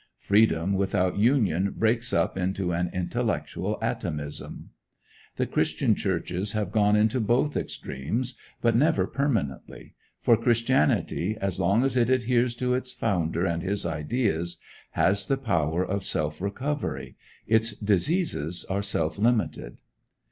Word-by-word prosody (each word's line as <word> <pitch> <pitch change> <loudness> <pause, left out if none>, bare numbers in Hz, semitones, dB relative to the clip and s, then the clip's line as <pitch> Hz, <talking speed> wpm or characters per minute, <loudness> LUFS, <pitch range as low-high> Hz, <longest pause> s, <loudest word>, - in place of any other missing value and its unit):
Freedom 100 -3 +2
without 95 -1 0
union 100 - +2
breaks 115 +1 +1
up 85 - +1
into 95 0 -1
an 85 +1 -1
intellectual 90 -2 -2
atomism. 75 -1 -4 0.6
The - - 0
Christian - - +1
churches 95 +5 -2
have 105 -3 -2
gone 105 -1 +3
into 110 +4 +2
both 120 +6 +1
extremes, 115 - -3 0.3
but 115 -1 +3
never 155 +6 +3
permanently; 95 - -3 0.3
for 115 - +4
Christianity, 115 - +1
as 95 -2 -1
long 100 +6 +3
as 135 -1 0
it 120 -1 +3
adheres 125 -1 +2
to 125 +1 0
its 125 0 -2
founder 85 -8 -1
and 85 -2 -1
his 100 +2 -1
ideas, 85 - -1 0.3
has 100 +1 +2
the 135 - +1
power 85 - 0
of 100 0 -2
self 75 -2 -2
recovery. 100 - -3 0.3
Its 110 0 +3
diseases 100 - 0
are 100 +1 0
self 100 -3 -1
limited. 110 - 0
100 Hz, 130 wpm, -26 LUFS, 85-120 Hz, 0.6 s, for